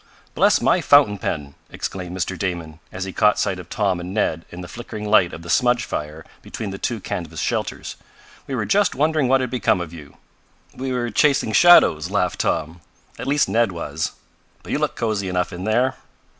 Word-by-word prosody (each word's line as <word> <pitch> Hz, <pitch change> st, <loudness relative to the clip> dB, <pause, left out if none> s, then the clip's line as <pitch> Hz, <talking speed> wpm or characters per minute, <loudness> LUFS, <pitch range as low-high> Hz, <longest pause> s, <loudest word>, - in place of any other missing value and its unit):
"Bless -, -, +3 dB
my -, -, +3 dB
fountain 135 Hz, -9 st, +5 dB
pen!" 70 Hz, -5 st, -4 dB, 0.2 s
exclaimed 90 Hz, -1 st, -5 dB
Mr. 95 Hz, +1 st, -2 dB
Damon, 85 Hz, -4 st, -4 dB
as 95 Hz, -, -5 dB
he 95 Hz, -1 st, -6 dB
caught 105 Hz, 0 st, +3 dB
sight 95 Hz, -3 st, -1 dB
of 90 Hz, -, -11 dB
Tom 100 Hz, -4 st, 0 dB
and 90 Hz, +3 st, -6 dB
Ned 85 Hz, -6 st, 0 dB
in 90 Hz, -, -9 dB
the 90 Hz, -, -8 dB
flickering 105 Hz, +1 st, -7 dB
light 105 Hz, -5 st, +4 dB
of 80 Hz, -, -9 dB
the -, -, -10 dB
smudge 120 Hz, +3 st, +2 dB
fire 75 Hz, +1 st, -5 dB, 0.2 s
between 105 Hz, -3 st, -6 dB
the 95 Hz, -, -7 dB
two 120 Hz, -3 st, -2 dB
canvas 85 Hz, -4 st, -5 dB
shelters. -, -, -3 dB, 0.5 s
"We 135 Hz, -, -3 dB
were 115 Hz, -4 st, -1 dB
just 200 Hz, -2 st, +2 dB
wondering 155 Hz, 0 st, +2 dB
what 135 Hz, +1 st, +3 dB
had 125 Hz, -, -3 dB
become 120 Hz, -7 st, +1 dB
of 85 Hz, -2 st, -6 dB
you." 75 Hz, -3 st, -12 dB, 0.6 s
"We 130 Hz, 0 st, -4 dB
were 120 Hz, -2 st, -2 dB
chasing 140 Hz, -6 st, +2 dB
shadows!" 110 Hz, -, +6 dB
laughed -, -, 0 dB
Tom. 80 Hz, +2 st, -1 dB, 0.4 s
"At -, -, -5 dB
least 145 Hz, +1 st, +2 dB
Ned 115 Hz, -2 st, +2 dB
was. 80 Hz, -3 st, -4 dB, 0.5 s
But -, -, -8 dB
you -, -, 0 dB
look -, -, -1 dB
cozy 105 Hz, -4 st, -2 dB
enough 90 Hz, 0 st, -1 dB
in 90 Hz, +2 st, -6 dB
there." 120 Hz, +4 st, +1 dB
95 Hz, 200 wpm, -21 LUFS, 85-120 Hz, 0.6 s, shadows